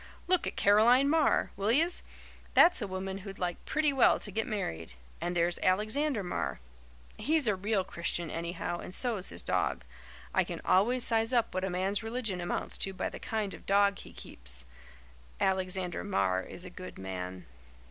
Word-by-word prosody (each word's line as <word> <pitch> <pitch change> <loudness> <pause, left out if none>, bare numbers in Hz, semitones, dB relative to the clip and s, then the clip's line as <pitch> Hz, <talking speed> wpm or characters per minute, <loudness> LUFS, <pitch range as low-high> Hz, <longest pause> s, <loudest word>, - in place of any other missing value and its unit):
Look 365 -1 +3
at - - -4
Caroline 235 +7 +5
Marr, 315 0 +2
will 200 +3 0
yez? 330 +8 +3 0.5
That's 350 -6 +6
a 205 - -2
woman 190 +1 -4
who'd 195 0 -9
like 175 -2 -3
pretty 300 -2 +2
well 265 - +5
to 205 - -5
get 220 +3 -1
married, 85 - -4 0.3
And 175 +1 -2
there's 170 +1 +1
Alexander 215 +6 +2
Marr. 65 - -3 0.6
He's 310 -1 +2
a 210 - +3
real 200 +1 0
Christian, 170 -2 -2
anyhow, 170 +1 -3
and 185 - -5
so's 225 -7 +1
his - - -3
dog. - - 0 0.5
I - - +3
can - - -6
always 240 +7 +3
size 225 +1 +2
up 235 -2 +2
what 185 0 -2
a 190 - 0
man's 190 +3 -1
religion 225 -5 -2
amounts 175 - -3
to 195 - -1
by - - -2
the - - -9
kind 215 -3 -3
of - - -12
dog 200 0 +3
he - - -11
keeps. - - -7 0.7
Alexander 185 -2 0
Marr 95 - +1
is 180 - -10
a 180 - -9
good 185 0 -9
man." 95 -1 -6
195 Hz, 180 wpm, -30 LUFS, 175-225 Hz, 0.7 s, That's